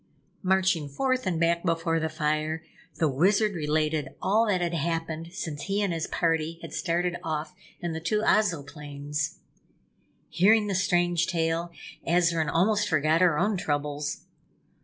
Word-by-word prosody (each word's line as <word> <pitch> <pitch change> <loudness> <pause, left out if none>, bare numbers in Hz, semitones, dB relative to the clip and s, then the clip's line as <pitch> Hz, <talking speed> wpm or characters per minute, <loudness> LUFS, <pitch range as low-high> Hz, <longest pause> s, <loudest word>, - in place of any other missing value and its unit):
Marching 185 -5 +2
forth 255 - 0
and 170 -3 0
back 170 0 +2
before 165 -1 +1
the 160 0 -1
fire, 155 0 -1 0.3
the 160 - +2
Wizard 200 +9 +2
related 155 -3 -1
all 220 +4 +2
that 195 -3 +2
had 175 -1 -1
happened 165 +1 -2
since 160 -6 -5
he 200 +1 0
and 190 -4 0
his 165 -1 -2
party 165 -1 0
had - - -8
started 175 0 0
off 155 +1 -3 0.3
in 175 -2 -2
the 160 - -3
two 210 +6 0
Ozoplanes. 150 -6 -1 0.9
Hearing 215 +4 +4
the 205 - -2
strange 175 -2 +2
tale, 165 -1 -1 0.4
Azarine 170 -2 +2
almost 205 +5 +2
forgot 155 +1 +2
her 175 -5 +4
own 205 +4 +1
troubles. 145 -2 -2
165 Hz, 145 wpm, -27 LUFS, 155-185 Hz, 0.9 s, Hearing